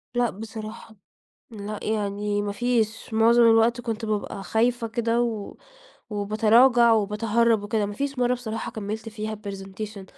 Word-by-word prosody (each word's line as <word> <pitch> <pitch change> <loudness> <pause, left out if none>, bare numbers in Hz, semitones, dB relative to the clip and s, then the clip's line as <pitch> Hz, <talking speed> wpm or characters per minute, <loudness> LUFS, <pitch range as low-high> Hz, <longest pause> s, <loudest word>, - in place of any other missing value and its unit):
لأ 240 -1 +2
بصراحة. 220 +1 -9 0.6
لأ، 210 -1 -6
يعني 205 -1 -1
ما 205 0 -3
فيش، 225 -1 -1
معظم 230 +2 +5
الوقت 230 +1 +4
كنت 230 -2 -4
بابقى 210 -2 -3
خايفة 235 +3 +1
كده 230 +1 0
و 220 -4 -4 0.5
وباتراجع 225 +4 +4
وباتهرَّب 220 +1 +2
وكده، 205 0 -1
ما 205 - -5
فيش 275 +5 -3
مرّة 245 0 +2
بصراحة 225 -2 -5
كمِّلت 220 0 -5
فيها 215 0 -5
الpresentation 200 0 -7
220 Hz, 135 wpm, -25 LUFS, 210-235 Hz, 0.6 s, معظم